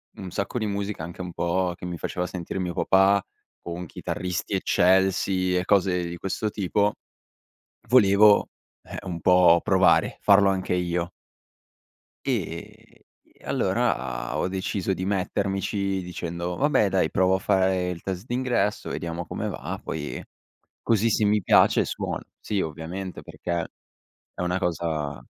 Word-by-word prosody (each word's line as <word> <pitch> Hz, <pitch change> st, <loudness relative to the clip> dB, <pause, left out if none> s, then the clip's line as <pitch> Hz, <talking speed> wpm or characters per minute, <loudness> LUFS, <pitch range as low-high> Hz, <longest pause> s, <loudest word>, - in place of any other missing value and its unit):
un 95 Hz, -2 st, -8 dB
sacco 100 Hz, +5 st, -3 dB
di 110 Hz, -, -1 dB
musica, 100 Hz, -3 st, -3 dB
anche 85 Hz, +2 st, -7 dB
un 90 Hz, -2 st, -6 dB
po' 90 Hz, +1 st, 0 dB
che 90 Hz, -, -9 dB
mi 90 Hz, -1 st, -4 dB
faceva 90 Hz, +2 st, -3 dB
sentire 90 Hz, +1 st, -5 dB
mio 90 Hz, -1 st, -2 dB
papà, 95 Hz, +1 st, +4 dB, 0.4 s
con 85 Hz, +1 st, -6 dB
chitarristi 90 Hz, +4 st, -4 dB
eccelsi 95 Hz, 0 st, +2 dB
e 90 Hz, -, -1 dB
cose 95 Hz, -3 st, +2 dB
di 85 Hz, -, -5 dB
questo 95 Hz, +4 st, -2 dB
tipo, 105 Hz, +1 st, 0 dB, 1.0 s
volevo, 105 Hz, -3 st, +6 dB, 0.3 s
eh, -, -, -9 dB
un 85 Hz, -2 st, -4 dB
po' 90 Hz, -1 st, +6 dB
provare, 95 Hz, -3 st, +3 dB
farlo 100 Hz, -1 st, +5 dB
anche 95 Hz, -1 st, -1 dB
io. 85 Hz, -1 st, -1 dB, 1.2 s
E -, -, -5 dB, 0.4 s
allora -, -, -1 dB
ho -, -, 0 dB
deciso 95 Hz, 0 st, -2 dB
di 95 Hz, 0 st, -4 dB
mettermici 100 Hz, 0 st, -1 dB
dicendo: 85 Hz, 0 st, -4 dB
"Vabbè 145 Hz, -7 st, +3 dB
dai, 95 Hz, -4 st, +1 dB
provo 95 Hz, 0 st, +2 dB
a -, -, -1 dB
fare 95 Hz, -2 st, +1 dB
il 85 Hz, -2 st, -5 dB
test 95 Hz, +2 st, -4 dB
d'ingresso, 120 Hz, -4 st, -1 dB
vediamo 85 Hz, +1 st, -4 dB
come -, -, -4 dB
va, -, -, -5 dB
poi 75 Hz, -2 st, -5 dB, 0.6 s
così 115 Hz, 0 st, +2 dB
se 105 Hz, -, +2 dB
mi 105 Hz, 0 st, +3 dB
piace -, -, +5 dB
suono". -, -, -4 dB, 0.2 s
Sì, 100 Hz, -2 st, -2 dB
ovviamente 85 Hz, +4 st, -5 dB
perché 85 Hz, -1 st, -4 dB, 0.7 s
è -, -, -8 dB
una 90 Hz, +1 st, 0 dB
cosa 80 Hz, -6 st, -2 dB
95 Hz, 140 wpm, -25 LUFS, 85-100 Hz, 1.2 s, volevo